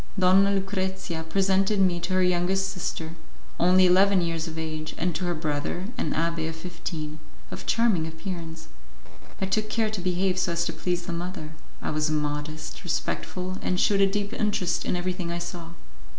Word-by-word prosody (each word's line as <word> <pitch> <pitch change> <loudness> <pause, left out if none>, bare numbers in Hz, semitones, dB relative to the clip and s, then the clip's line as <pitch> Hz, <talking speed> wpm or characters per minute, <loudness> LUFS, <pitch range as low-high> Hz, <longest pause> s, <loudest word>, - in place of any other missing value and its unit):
Donna 190 +1 +6
Lucrezia 190 -3 -1
presented 195 +2 +3
me 180 -2 +3
to 170 +2 -2
her 185 0 +4
youngest 180 +2 +2
sister, 165 -3 -3 0.5
only 185 +2 +6
eleven 190 +2 +6
years 165 -1 -1
of 160 0 -6
age, 155 -1 -4
and 175 +1 0
to 180 - -2
her 175 -1 0
brother, 155 +5 -2
an - - -1
abbé 165 0 0
of 160 - -6
fifteen, 160 -2 -5 0.3
of - - -7
charming 220 -9 +3
appearance. 165 -1 -6 0.7
I 190 - +1
took 215 +3 0
care 220 -1 +1
to 210 -4 -3
behave 185 +1 +1
so 175 - +1
as 170 0 +1
to - - -2
please 175 -1 -1
the 170 - -3
mother; 170 -2 -5 0.3
I - - -1
was 155 0 +1
modest, 150 0 -3
respectful, 185 +1 -2
and 180 - 0
shewed 200 -1 +4
a 195 - +6
deep 205 +1 -2
interest 195 -5 0
in - - +1
everything 180 -1 -2
I 170 - -2
saw. 170 -1 -6
180 Hz, 180 wpm, -27 LUFS, 165-190 Hz, 0.7 s, Donna